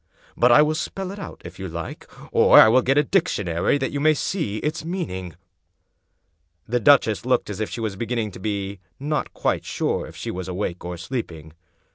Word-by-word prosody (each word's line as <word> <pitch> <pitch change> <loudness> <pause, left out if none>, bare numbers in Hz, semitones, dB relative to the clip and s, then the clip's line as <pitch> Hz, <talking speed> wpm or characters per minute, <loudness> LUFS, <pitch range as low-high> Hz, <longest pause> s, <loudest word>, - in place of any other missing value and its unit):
But 120 +1 +4
I 150 +5 +8
will 155 +1 +1
spell 190 +4 -4
it 200 - -8 0.3
if 90 +2 -10
you 95 - -4
like. 85 0 -7 0.2
Or - - +7
I - - +9
will 130 +3 +5
get 135 +3 +1
a 150 - +5
dictionary, 105 - +1
that 135 -2 -2
you 140 - -2
may 155 +1 +4
see 140 - -2
its 155 +6 -3
meaning." 95 - -4 1.3
The 125 +2 +1
duchess 115 -3 +4
looked 125 -4 +1
as 100 - -6
if 110 - -2
she 115 - -5
was 110 -3 -2
beginning 115 0 -2
to 95 - -11
be 100 -1 -3 0.2
not 150 +2 -2
quite - - 0
sure - - -2
if - - -13
she - - -5
was 90 0 -5
awake 90 -1 -4
or 90 0 -5
sleeping. 85 - -6
115 Hz, 195 wpm, -23 LUFS, 95-145 Hz, 1.3 s, I